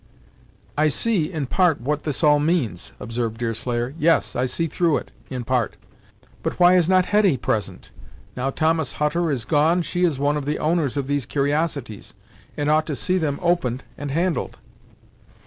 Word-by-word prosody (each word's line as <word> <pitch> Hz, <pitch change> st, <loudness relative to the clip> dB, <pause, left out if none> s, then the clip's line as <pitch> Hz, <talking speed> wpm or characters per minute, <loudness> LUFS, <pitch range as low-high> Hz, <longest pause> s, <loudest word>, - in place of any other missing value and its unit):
"I 155 Hz, +1 st, +3 dB
see, 175 Hz, -, +1 dB
in 155 Hz, -5 st, -2 dB
part, 170 Hz, +2 st, +2 dB
what 145 Hz, +5 st, -1 dB, 0.2 s
all 150 Hz, -1 st, +6 dB
this 145 Hz, -, 0 dB
means," 125 Hz, -, -1 dB
observed 115 Hz, -1 st, -3 dB
Deerslayer 120 Hz, +2 st, -2 dB
"yes, 165 Hz, -1 st, +2 dB
I 125 Hz, -, +1 dB
see 130 Hz, +6 st, 0 dB
through 165 Hz, -1 st, +1 dB
it, -, -, -8 dB, 0.2 s
in 125 Hz, -2 st, -4 dB
part. 120 Hz, -2 st, 0 dB, 0.7 s
But -, -, -3 dB
why 175 Hz, 0 st, +7 dB
is 180 Hz, -2 st, +3 dB
not 185 Hz, -1 st, +4 dB
Hetty 205 Hz, -8 st, +3 dB
present? 100 Hz, -5 st, -3 dB, 0.4 s
Now 125 Hz, +2 st, -1 dB
Thomas 160 Hz, 0 st, 0 dB
Hutter 160 Hz, +3 st, 0 dB
is 130 Hz, -6 st, -2 dB
gone, 165 Hz, +3 st, +3 dB
she 175 Hz, +2 st, -2 dB
is 165 Hz, -6 st, +2 dB
one 145 Hz, +2 st, +1 dB
of 145 Hz, -, -4 dB
the 150 Hz, -, 0 dB
owners 155 Hz, -4 st, 0 dB
of 140 Hz, -, -1 dB
these 145 Hz, -2 st, -1 dB
cur'osities, 140 Hz, -6 st, -2 dB, 0.4 s
and 145 Hz, -, -1 dB
ought 155 Hz, +1 st, +3 dB
to 150 Hz, -, -2 dB
see 185 Hz, +6 st, 0 dB
them 145 Hz, -4 st, -1 dB
opened 165 Hz, -8 st, 0 dB
and 145 Hz, 0 st, -6 dB
handled." 170 Hz, +4 st, -1 dB
150 Hz, 175 wpm, -22 LUFS, 130-170 Hz, 0.7 s, why